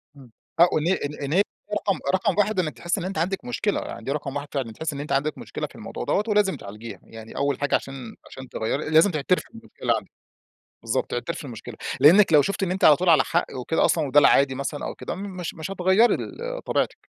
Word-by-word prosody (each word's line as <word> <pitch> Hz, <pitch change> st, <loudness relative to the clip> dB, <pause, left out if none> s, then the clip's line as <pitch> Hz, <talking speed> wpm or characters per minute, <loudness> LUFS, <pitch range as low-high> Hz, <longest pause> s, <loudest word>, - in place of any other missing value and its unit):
إمم. 130 Hz, -4 st, -15 dB, 0.3 s
آه، -, -, +9 dB
او -, -, +1 dB
إن 155 Hz, +2 st, -1 dB, 0.4 s
إن 140 Hz, +2 st, -2 dB
هي 190 Hz, -, +5 dB, 0.3 s
رقم 205 Hz, -2 st, 0 dB
رقم 190 Hz, 0 st, +1 dB
1 205 Hz, -1 st, +2 dB
إنِك 155 Hz, -8 st, -2 dB
تحسّي 175 Hz, +8 st, -1 dB
إن -, -, -4 dB
أنتِ 195 Hz, +1 st, -4 dB
عَندِك 190 Hz, +7 st, -1 dB
مشكلة، 215 Hz, -4 st, -1 dB
يعني -, -, -8 dB
دي 135 Hz, -, -2 dB
رقم 145 Hz, -1 st, -4 dB
1 145 Hz, 0 st, -4 dB
فعلًا، 130 Hz, -5 st, -2 dB
تحسّي 155 Hz, +4 st, -4 dB
إن 140 Hz, -, -5 dB
أنتِ 145 Hz, -, -7 dB
عندِك 140 Hz, +2 st, 0 dB
مشكلة -, -, -5 dB
في -, -, -19 dB
الموضوع -, -, -7 dB
دَوّة 205 Hz, -, +1 dB
ولازم 210 Hz, -2 st, +2 dB
تعالجيها، 105 Hz, +3 st, -9 dB
يعني 115 Hz, 0 st, -12 dB
أول 140 Hz, -1 st, 0 dB
حاجة 145 Hz, -, +1 dB
عشان 135 Hz, -4 st, -5 dB
-عشان 130 Hz, 0 st, -10 dB
تغيّري 135 Hz, +7 st, -2 dB
لازم 160 Hz, +5 st, +5 dB
تعترفي 155 Hz, +3 st, 0 dB
بالمشكلة 230 Hz, 0 st, -3 dB
عندِك. -, -, -10 dB, 0.7 s
بالضبط، -, -, -2 dB
تعترفي -, -, -3 dB
بالمشكلة -, -, -8 dB, 0.2 s
لأنِّك 175 Hz, +4 st, +7 dB
لو 150 Hz, -, +8 dB
شُفتِ 200 Hz, +6 st, -2 dB
إن 180 Hz, -, -1 dB
أنتِ 190 Hz, -, -3 dB
على 150 Hz, -, +8 dB
طول 180 Hz, +3 st, 0 dB
على 160 Hz, -, +6 dB
حق 175 Hz, -, 0 dB
وكده 130 Hz, +6 st, +1 dB
أصلًا 155 Hz, -4 st, +1 dB
وده 145 Hz, +2 st, +6 dB
العادي 140 Hz, -1 st, +4 dB
مثلًا 140 Hz, +2 st, -4 dB
أو -, -, -5 dB
كده، -, -, -5 dB
مش 185 Hz, -3 st, -6 dB
مش 160 Hz, +4 st, -6 dB
هتغيّري 190 Hz, +5 st, +4 dB
ال -, -, -6 dB
طبيعتِك. -, -, 0 dB
160 Hz, 225 wpm, -24 LUFS, 140-190 Hz, 0.7 s, آه